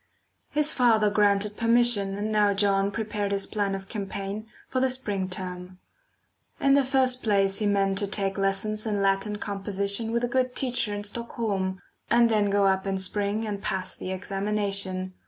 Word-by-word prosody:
His 300 0 +2
father 220 -4 +3
granted 205 0 +2
permission, 230 -4 +3
and 210 +2 -3
now 205 -1 +3
John 195 -1 +2
prepared 210 -1 -3
his 195 -1 +1
plan 200 -2 -2
of 195 0 -8
campaign 200 0 -5 0.2
for 260 - -2
the 260 0 +2
spring 205 -7 -2
term. 180 0 -6 0.8
In 275 - +3
the 280 0 +4
first 260 -1 +2
place 195 -2 +2
he 210 - 0
meant 195 -1 +2
to 205 - 0
take 195 -1 +1
lessons 210 +3 +1
in 205 -2 -1
Latin 195 +2 +1
composition 200 +2 -2
with 235 +1 -1
a - - +2
good 255 0 -1
teacher 245 -4 0
in 205 0 -4
Stockholm, 205 -4 -3 0.3
and 235 0 +4
then 210 -2 +2
go 200 0 +2
up 190 0 +1
in 195 0 -1
spring, 205 +3 -2
and 205 -2 -4
pass 185 -1 -2
the - - -7
examination. 195 -1 -2
205 Hz, 175 wpm, -26 LUFS, 195-220 Hz, 0.8 s, the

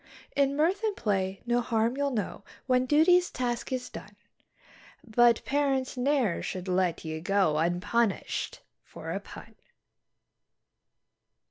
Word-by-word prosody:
In 280 0 +2
mirth 340 +8 +1
and 425 -2 0
play 195 -3 -1
no 240 0 +2
harm 230 +1 0
you'll 285 0 0
know 210 -5 -3 0.2
when 255 -1 +2
duty's 355 +5 +5
task 245 -1 -3
is 255 -1 -2
done; 205 +1 -10 0.9
But 235 0 +3
parents 275 -2 0
ne'er 255 -7 +1
should 185 0 -5
let 180 -2 0
ye 160 0 -4
go 195 -2 +2
un_pun_ished 175 +7 -1 0.2
for - - -8
a - - -2
PUN. - - -12
240 Hz, 125 wpm, -28 LUFS, 195-275 Hz, 0.9 s, duty's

